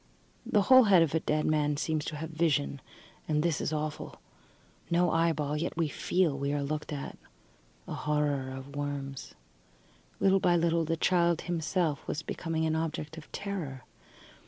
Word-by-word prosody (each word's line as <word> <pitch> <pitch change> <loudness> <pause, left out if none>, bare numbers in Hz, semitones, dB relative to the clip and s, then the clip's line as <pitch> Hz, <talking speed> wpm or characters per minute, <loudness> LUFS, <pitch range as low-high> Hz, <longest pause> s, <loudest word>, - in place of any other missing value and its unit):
The 205 - +3
whole 260 +2 +7
head 190 -5 +6
of 155 - -2
a 160 - +3
dead 155 0 0
man 150 -1 +1
seems 155 0 -1
to 155 - -4
have 160 +2 -5
vision, 155 - 0 0.5
and 150 0 +1
this 170 -3 0
is - - -1
awful. 155 -1 -4 0.7
No 175 0 +3
eyeball, 155 -3 +1
yet 165 +2 -3
we 165 -3 +1
feel 180 +2 +1
that 140 - -5
we 140 +1 -1
are 145 -1 -1
looked 150 +2 -3
at. 145 -2 -6 0.7
A - - -5
horror 145 -3 0
of 135 +2 -8
worms. 140 -2 -5 0.8
Little 195 0 +4
by 175 -2 +3
little 170 -1 +2
the 165 +1 -1
child 170 -1 +2
himself 165 -2 -1
was 160 - -3
becoming 160 -1 -2
an 160 0 +1
object 160 -1 -3
of 160 -2 -12
terror. 170 -10 -5
155 Hz, 170 wpm, -30 LUFS, 145-170 Hz, 0.8 s, whole